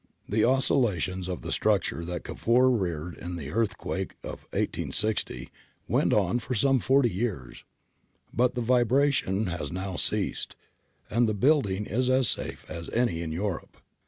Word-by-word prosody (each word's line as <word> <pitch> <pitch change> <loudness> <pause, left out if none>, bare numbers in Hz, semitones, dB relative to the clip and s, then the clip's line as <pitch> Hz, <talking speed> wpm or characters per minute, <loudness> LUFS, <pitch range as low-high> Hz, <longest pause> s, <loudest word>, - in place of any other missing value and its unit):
The 110 +1 +1
oscilla 125 -5 +3
tions 95 +2 -3
of 90 -2 -5
the - - -5
structure 85 - +1
that 90 +1 -4
Cavour 125 +3 +2
reared 90 -7 -2
in 90 +1 -5
the 75 -4 -6
earthquake 105 -4 -2
of - - -8
i860 110 +1 -2 0.4
went - - +2
on 120 - +2
for 125 +1 -4
some 135 +4 +3
forty 130 +1 +3
years; 95 - -4 0.7
but 125 +1 +2
the 125 - -1
vibration 120 -3 +2
has 85 -1 -4
now 95 0 -4
ceased, - - 0 0.6
and 115 +1 +3
the 110 - -1
building 105 -5 +2
is 125 +5 0
as 130 -1 +4
safe - - -1
as 85 -1 -7
any 115 -9 0
in 80 -2 -4
Europe. 90 +1 -4
110 Hz, 155 wpm, -27 LUFS, 90-125 Hz, 0.7 s, as